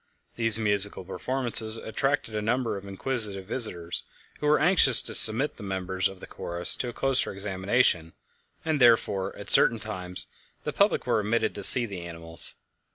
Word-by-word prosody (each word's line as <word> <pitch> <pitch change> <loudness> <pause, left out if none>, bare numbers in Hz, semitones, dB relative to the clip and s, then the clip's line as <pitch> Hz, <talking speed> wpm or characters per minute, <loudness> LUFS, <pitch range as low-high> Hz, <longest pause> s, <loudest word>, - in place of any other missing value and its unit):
These 115 -2 +4
musical 105 -3 0
performances 115 +2 0
attracted 125 +2 -3
a 105 - -3
number 120 +2 -2
of 100 0 -9
inquisitive 100 -2 -1
visitors, 90 -7 -1 0.4
who 150 - -3
were 150 - +3
anxious 155 -7 +4
to - - -6
submit 115 +7 +3
the - - -13
members 95 -1 -3
of 95 -1 -13
the - - -9
chorus 85 0 -5
to 125 - -4
a - - -9
closer 135 +1 0
examination, 95 -3 0 0.5
and 155 -3 -1
therefore, 100 -5 +2
at 100 - -2
certain 115 - +4
times, 95 -4 -4 0.4
the - - -5
public - - +1
were - - 0
admitted 110 +3 -1
to 100 - -8
see 120 +5 +9
the 100 -5 -8
animals. 85 -1 -7
105 Hz, 165 wpm, -25 LUFS, 95-120 Hz, 0.5 s, see